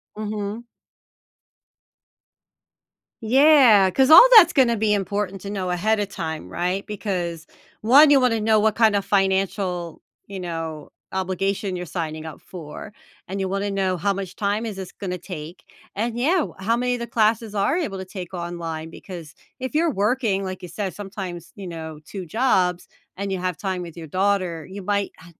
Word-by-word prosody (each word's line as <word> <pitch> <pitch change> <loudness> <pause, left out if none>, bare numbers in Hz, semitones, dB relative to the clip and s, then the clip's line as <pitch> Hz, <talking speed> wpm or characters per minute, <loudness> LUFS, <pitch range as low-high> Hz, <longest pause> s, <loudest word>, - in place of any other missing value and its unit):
Mhm. 215 +2 -4 2.6
Yeah, 250 -5 +6
'cause 265 - +3
all 355 +10 +11
that's 345 -5 +9
gonna 250 -5 +4
be 210 0 +2
important 200 -1 -2
to 200 - -7
know 190 -3 -3
ahead 210 +5 +1
of 200 -1 -2
time, 160 -4 -5
right? 180 +3 -2
Because 180 -6 -4 0.3
1, 280 +7 +7
you 285 - +6
wanna 240 -4 +2
know 215 0 +3
what 215 0 +2
kind 220 -2 +4
of 200 -1 0
financial, 190 -3 0 0.3
you 195 -1 -7
know, 165 -3 -5 0.2
obligation 190 +1 -2
you're 180 - -5
signing 160 -2 -5
up 160 - -9
for, 170 +3 -9 0.4
and 195 +2 -4
you 190 - -1
wanna 195 +1 -2
know 190 -2 0
how 200 +3 0
much 195 -1 -5
time 205 +2 -1
is 215 - -5
this 190 -2 -7
gonna 180 -3 -5
take, 170 -1 -9 0.3
and 230 +3 -2
yeah, 310 +10 +2
w 310 - -3
how 225 +5 +1
many 250 +1 0
of 245 - -6
the 235 - -4
classes 220 -1 +1
are 205 - +1
you 345 - 0
able 195 -8 -6
to 190 - -6
take 185 -1 -8
online, 170 -2 -5
because 165 -2 -10 0.3
if 260 +2 -5
you're 325 +1 +2
working, 210 -3 0
like 185 -1 -5
you 180 - -7
said, 190 +2 -4
sometimes, 190 -4 -7
you 195 -2 -8
know, 160 -2 -7
2 190 -3 -7
jobs 180 -4 +1 0.3
and 200 0 -3
you 190 - -1
have 180 0 -2
time 190 -2 -3
with 170 -2 -8
your 165 -2 -8
daughter, 185 -2 0
you 200 +2 -7
might 200 +1 -1
han 170 +1 -16
195 Hz, 180 wpm, -23 LUFS, 180-215 Hz, 2.6 s, all